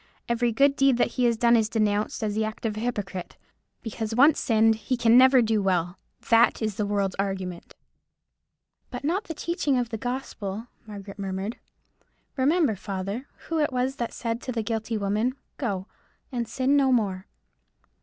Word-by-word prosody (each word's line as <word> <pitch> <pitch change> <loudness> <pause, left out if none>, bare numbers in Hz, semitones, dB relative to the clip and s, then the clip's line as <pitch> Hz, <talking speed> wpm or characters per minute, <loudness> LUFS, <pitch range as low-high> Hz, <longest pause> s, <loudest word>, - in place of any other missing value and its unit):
Every 235 0 +1
good 275 +5 +3
deed 275 -3 +3
that - - +2
he 250 - 0
has 235 -1 +2
done 235 +1 +4
is 220 -2 +2
denounced 215 -1 0
as 210 -1 -1
the 220 +1 0
act 215 +1 -5
of 215 -2 -1
a - - -4
hypocrite. 205 -6 -4 0.5
Because 225 -1 -4
once 285 +5 +5
sinned 225 -1 +3
he 220 +4 -3
can 235 -1 +4
never 260 0 +7
do 220 -1 +1
well. 180 -2 0 0.3
That 230 +1 +5
is 220 -2 -1
the 205 +1 -2
world's 200 -2 0
argument." 190 -3 -4 1.1
"But 245 - -7
not 360 +8 0
the 325 - -6
teaching 300 -5 0
of 245 -2 -1
the 225 -2 -5
gospel," 225 -4 -4 0.2
Margaret 200 -1 -9
murmured. 195 +3 -4 0.8
"Remember, 285 - +2
father, 200 +6 -5 0.2
who 325 -1 -1
it 295 -2 +1
was 255 +2 -1
that 235 - -3
said 230 0 -3
to 255 - -4
the 230 -2 -2
guilty 225 0 -2
woman, 210 +5 0 0.2
Go, 200 -8 -2 0.5
and 240 -3 -2
sin 260 +4 +1
no 275 -2 +4
more.'" 200 -5 0
225 Hz, 175 wpm, -26 LUFS, 205-255 Hz, 1.1 s, never